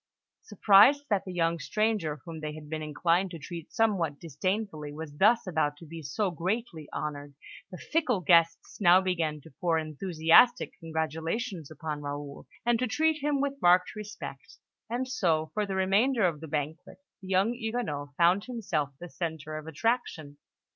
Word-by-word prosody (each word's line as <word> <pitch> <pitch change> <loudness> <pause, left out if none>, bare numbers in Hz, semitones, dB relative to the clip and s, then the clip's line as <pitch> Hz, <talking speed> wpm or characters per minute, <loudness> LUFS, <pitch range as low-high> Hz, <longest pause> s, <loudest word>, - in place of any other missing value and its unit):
Surprised 215 +8 +5
that 200 -2 +1
the 185 - -6
young 170 -1 0
stranger 195 -5 -1
whom 165 -2 -7
they 155 0 -5
had 155 -1 -10
been 155 -1 -3
inclined 170 +5 +1
to 170 - -7
treat 165 +2 -8
somewhat 195 -11 +1
disdainfully 165 0 -3
was 150 0 -8
thus 225 +7 +4
about 155 -5 0
to 165 - -12
be 165 +1 -8
so 190 +6 -1
greatly 175 -2 -3
honoured, 145 -2 -5 0.3
the 180 - -9
fickle 280 - 0
guests 165 +2 +2
now 180 -1 +7
began 170 -5 -1
to 150 0 -16
pour 170 -2 +2
enthusiastic 165 - +3
congratulations 160 - -3
upon 155 -1 -5
Raoul, 145 0 -6 0.2
and 240 -1 +2
to 255 - 0
treat 310 +5 +1
him 285 -1 +1
with 280 0 -2
marked 180 +3 +4
respect; 200 -10 -8 0.3
and 245 +3 -2
so, 165 -11 0
for 210 -1 -1
the 195 - -3
remainder 200 +5 +2
of 160 -4 -1
the 160 - -7
banquet, 150 +1 -4 0.2
the 190 - -10
young 190 +5 +2
Huguenot 220 - -4
found 180 +4 +4
himself 175 - -2
the 175 - -7
centre 160 -3 -5
of 155 0 -7
attraction. 160 - -2
170 Hz, 165 wpm, -29 LUFS, 155-215 Hz, 0.3 s, now